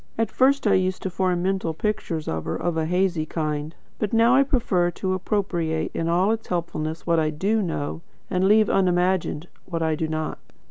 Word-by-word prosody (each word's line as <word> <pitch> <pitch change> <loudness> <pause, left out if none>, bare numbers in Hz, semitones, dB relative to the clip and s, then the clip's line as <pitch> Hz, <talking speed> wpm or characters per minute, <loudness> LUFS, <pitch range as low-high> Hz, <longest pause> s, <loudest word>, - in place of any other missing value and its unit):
At 225 -1 0
first 275 +1 +3
I 205 - +4
used 185 0 +1
to 190 - -2
form 180 -1 0
mental 185 -4 -1
pictures 205 -5 -2
of 80 0 -3
her, 80 - -2
of 175 -1 -2
a 160 -1 0
hazy 180 -2 +1
kind; 155 -1 -3 0.2
but 210 -1 -2
now 230 +2 +5
I 270 - +6
prefer 230 -10 +1
to 185 +2 -2
appropriate 175 -5 -1
in 165 - -2
all 180 +5 +3
its 225 0 -3
helpfulness 165 -2 -3
what 170 -1 +3
I 155 -1 +1
DO 200 +9 0
know, 160 -4 -3 0.3
and 185 +1 +1
leave 215 +1 +5
unimagined 180 -3 +1 0.2
what 165 -2 -2
I 160 -1 +1
do 160 +1 -1
not. 155 0 -3
180 Hz, 195 wpm, -24 LUFS, 160-200 Hz, 0.3 s, I